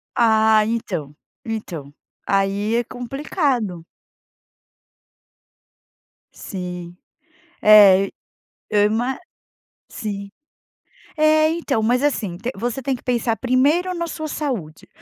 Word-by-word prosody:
Ah, 220 -1 +4
então, 170 -10 -3 0.3
então, 170 -11 -6 0.3
aí 200 +2 +1
é 240 - +2
complicado. 245 - -2 2.5
Sim. 180 -2 -7 0.7
É, 200 -2 +7 0.6
eu 205 -1 +3
ima 240 +5 -1 0.7
sim. 200 -3 -6 0.9
É, 310 0 +4
então, 315 -8 -1
mas 245 +4 +1
assim, 210 -11 -1
t 235 +6 -4
você 240 +5 -3
tem 270 +1 -1
que - - -13
pensar 235 -2 0
primeiro 285 - +2
na 340 0 -2
sua 315 -1 -5
saúde, 240 - -4
225 Hz, 95 wpm, -21 LUFS, 200-265 Hz, 2.5 s, É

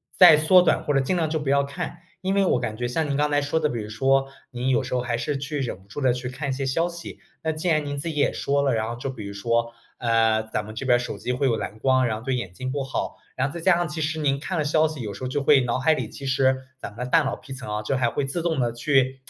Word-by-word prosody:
再 175 -5 +9
缩 170 +4 +6
短 175 - +2
或 145 - 0
者 135 - +4
尽 135 +8 0
量 165 -3 0
就 160 0 -1
不 145 -2 -3
要 140 0 +4
看。 140 +4 -6 0.2
因 190 +1 0
为 200 -1 +3
我 125 - +2
感 110 -3 -3
觉 120 - -2
像 145 +5 -1
您 140 - 0
刚 150 0 +1
才 145 0 +3
说 145 +3 0
的， 155 - +2
比 120 -4 -3
如 105 - -7
说 135 +4 +2 0.2
您 125 +1 -2
有 130 +1 +2
时 125 - -5
候 125 - +1
还 120 -1 -1
是 145 +4 -2
去 145 +2 -4
忍 115 -7 -4
不 95 - -23
住 145 - -7
地 130 -2 +3
去 125 0 -4
看 140 +3 -4
一 - - +1
些 135 +1 -2
消 165 +6 +1
息。 170 -1 -9 0.2
那 160 - +1
既 155 +3 -4
然 155 -2 +2
您 145 0 -4
自 140 +4 -3
己 160 - -5
也 145 - +2
说 140 0 0
了， 140 -2 +2
然 110 0 -1
后 120 - -4
就 135 +3 -4
比 115 -6 -7
如 100 - -6
说， 115 +3 0 0.3
呃， 115 -2 +2
咱 105 - -1
们 110 +1 -9
这 125 - -4
边 120 -2 +4
手 125 - -5
机 125 - -3
会 130 +2 +1
有 120 - +2
蓝 110 -1 -5
光， 130 +1 +3
然 110 -3 -1
后 - - -13
对 130 0 0
眼 100 -8 -4
睛 130 +6 -4
不 140 0 -2
好。 135 - -3 0.2
然 130 +1 +1
后 150 - -11
再 170 - -5
加 185 +1 +5
上 175 0 0
其 155 +1 -5
实 155 +1 -1
您 140 -2 +1
看 170 +5 -3
了 155 - 0
消 155 +1 +3
息， 155 -3 -6
有 105 -3 -4
时 130 - -9
候 130 - -2
就 145 +2 -1
会 140 0 +5
脑 125 0 -1
海 155 +5 +4
里 - - -3
其 140 - -9
实， 130 0 +2 0.2
咱 - - -7
们 110 - -14
的 - - -7
大 165 +4 +5
脑 135 - -2
皮 135 - -10
层 130 -5 -6
啊， 105 - -1
就 105 +5 -1
还 125 -2 +2
会 135 - -2
自 135 +6 -3
动 165 -3 0
地 120 -2 0
去 130 +1 +1
135 Hz, 350 characters per minute, -24 LUFS, 120-150 Hz, 0.3 s, 再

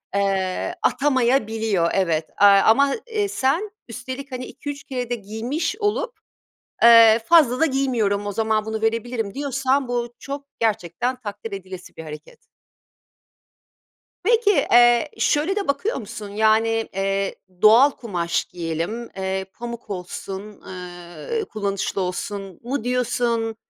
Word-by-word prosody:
eee, 195 -2 0
atamayabiliyor, 225 -8 +1
evet, 165 -5 0
eee, 205 - +9
ama, 220 +8 +5
eee, 425 -3 -1
sen 345 +8 0 0.2
üstelik 260 +3 -7
hani 255 0 -5
2-3 285 -1 -7
kere 250 -3 -4
de 245 - 0
giymiş 235 - -3
olup, 430 +3 -1 0.7
eee, 230 -1 +8
fazla 290 -6 +5
da 325 - +5
giymiyorum, 240 -8 0
o 205 - -2
zaman 220 0 0
bunu 220 0 -4
verebilirim 225 -1 -1
diyorsan 275 -1 0
bu 240 -1 -2
çok 280 0 -6
gerçekten 225 +3 -1
takdir 205 0 -7
edilesi 185 -2 -8
bir 160 - -8
hareket. 150 0 -10 1.9
Peki, 450 0 +4
eee, 240 -3 +4
şöyle 315 +7 +1
de 405 -5 -2
bakıyor 280 +11 0
musun, 215 -3 -7
yani, 220 +2 +3 0.3
eee, 195 0 -1 0.3
"Doğal 235 +7 +7
kumaş 180 -10 -2
giyelim, 170 +7 -4
eee, 190 0 -2
pamuk 235 -2 -8
olsun, 195 +2 -7
ııı, 180 - -6
kullanışlı 200 - -2
olsun" 190 +1 -4
mu 245 0 -3
diyorsun? 240 -2 0
225 Hz, 125 wpm, -22 LUFS, 195-265 Hz, 1.9 s, eee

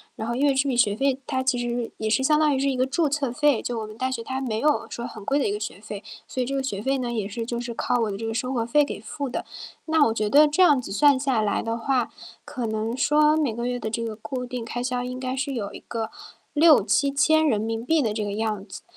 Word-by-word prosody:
然 220 - -5
后 235 - -1
因 280 +3 +1
为 280 - +4
这 275 +1 +1
笔 245 - 0
学 205 -4 +3
费 270 +1 +1
它 260 - -1
其 260 -1 +1
实 240 0 -2
是 240 -1 -3
也 220 - -3
是 220 +4 +2
相 300 +3 +3
当 300 -2 +3
于 265 - 0
是 275 - +1
一 260 - -1
个 255 - +2
注 290 +3 +1
册 275 -4 -1
费， 290 -2 +2
就 240 -2 -2
我 215 - -5
们 215 - -11
大 260 +2 -1
学 230 -3 -3
它 260 +2 -3
没 225 -5 -2
有 300 +2 +2
说 235 +1 -5
很 215 -4 -10
贵 280 +4 +2
的 - - +1
一 200 - 0
个 210 - -3
学 210 -2 -6
费。 205 -2 -7 0.2
所 255 - -3
以 250 - 0
这 275 - -4
个 275 - 0
学 210 -7 -4
费 270 +1 +1
呢， 245 -1 -2
也 215 -4 -2
是 230 +2 -5
就 235 0 -2
是 240 -1 -5
靠 245 +1 0
我 215 - 0
的 195 - -4
这 225 +1 -4
个 - - -2
生 250 +3 -2
活 230 -2 0
费 290 +5 +3
给 - - -6
付 275 +5 -5
的。 245 - -3 0.4
那 315 -2 +4
我 225 - +1
觉 215 -2 -1
得 300 +4 +7
这 300 +5 +1
样 295 -7 +6
子 250 - -7
算 280 +6 +4
下 260 -4 +1
来 210 -1 0
的 230 0 -2
话， 245 0 0 0.3
可 245 -4 -4
能 220 +2 -2
说 300 +2 +4
每 285 -8 0
个 235 +1 -3
月 245 0 -2
的 220 - -3
这 230 +1 -2
个 220 -1 -4
固 250 +3 -5
定 245 -1 -5
开 245 +1 -4
销 250 0 -1
应 250 +1 -5
该 255 0 -3
是 275 +1 -2
有 205 -4 -4
一 - - -8
个 225 -1 -5 0.4
¥6000-¥7000 280 - +3
的 220 -3 0
这 215 0 -2
个 205 -1 -3
样 215 -2 -2
子， 190 - -10
245 Hz, 305 characters per minute, -24 LUFS, 225-275 Hz, 0.4 s, 得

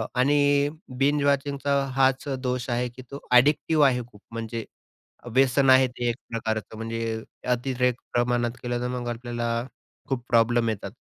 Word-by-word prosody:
आणि 145 +2 +3 0.3
बिंज 145 +2 +2
वॉचिंगचा 140 0 +1 0.2
हाच 135 0 +2
दोष 125 0 -2
आहे 120 +1 0
की 120 +2 -12
तो 140 - -6
अ‍ॅडिक्टिव्ह 145 +4 +4
आहे 125 -2 +1
खूप 105 - -18
म्हणजे 115 0 -4 0.7
व्यसन 135 +1 +4
आहे 130 0 +7
ते, 125 -1 -4
एक 120 - -1
प्रकारचं 110 -1 -3
म्हणजे 115 0 -3 0.3
अतिरेक 125 0 +1 0.2
प्रमाणात 120 -1 +1
केलं, 120 0 -2
तर 125 - -1
मग 125 -1 -4
आपल्याला 120 0 -4 0.6
खूप 125 -3 -2
प्रॉब्लेम 115 0 +3
येतात 100 -2 -4
125 Hz, 145 wpm, -25 LUFS, 115-135 Hz, 0.7 s, आहे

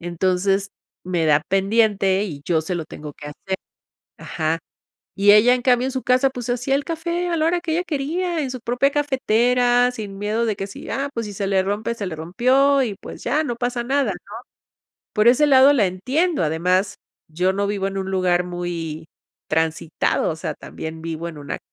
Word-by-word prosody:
entonces 185 +3 0 0.4
me 175 -3 0
da 150 -1 +4
pendiente 195 -1 +2
y 145 -7 -7
yo 165 -3 +1
se 180 +3 -3
lo 165 - -3
tengo 150 -1 -9
que 150 - -10
hacer 190 +6 -5 0.6
ajá, 160 0 -2 0.6
y 205 +1 +5
ella, 225 +4 +6
en 250 - -3
cambio, 250 0 +3
en - - -2
su 260 - -3
casa, 255 +2 +3
pues 250 -2 -7
se - - 0
hacía 250 +3 0
el 285 - 0
café 340 +2 -2
a 335 - 0
la 310 - +1
hora 345 +1 +1
que 340 - -3
ella 350 - 0
quería 330 +3 -2
en 265 - -3
su 255 - -6
propia 245 +4 +1
cafetera, 250 -3 +2
sin 205 -5 -7
miedo 215 +3 -1
de 215 -3 -1
que 195 - -4
si, 200 - -10
ah, 275 +1 -2
pues 230 -3 -3
si 205 - -6
se 195 0 -3
le 190 -1 +2
rompe, 205 +4 -2
se 205 -4 -4
le 175 - -4
rompió 260 - +3
y 220 -5 -3
pues - - -10
ya 295 +6 +1
no 240 -4 -2
pasa 245 0 -2
nada, 275 +2 +1
¿no?, - - -13 0.8
por 210 0 +2
ese 275 +5 +5
lado, 270 +1 +7
la 220 -8 +3
entiendo, 260 - 0
además, 180 +5 +1 0.3
yo 180 +4 0
no 200 +1 -1
vivo 200 -1 -1
en 195 0 -4
un 190 - -3
lugar 180 -1 +1
muy 170 -3 -5 0.4
transitado, 160 +1 0
o 160 - -4
sea, - - -4
también 160 0 -8
vivo 165 0 -4
en 160 - -9
una 145 - -5
210 Hz, 205 wpm, -22 LUFS, 180-260 Hz, 0.8 s, lado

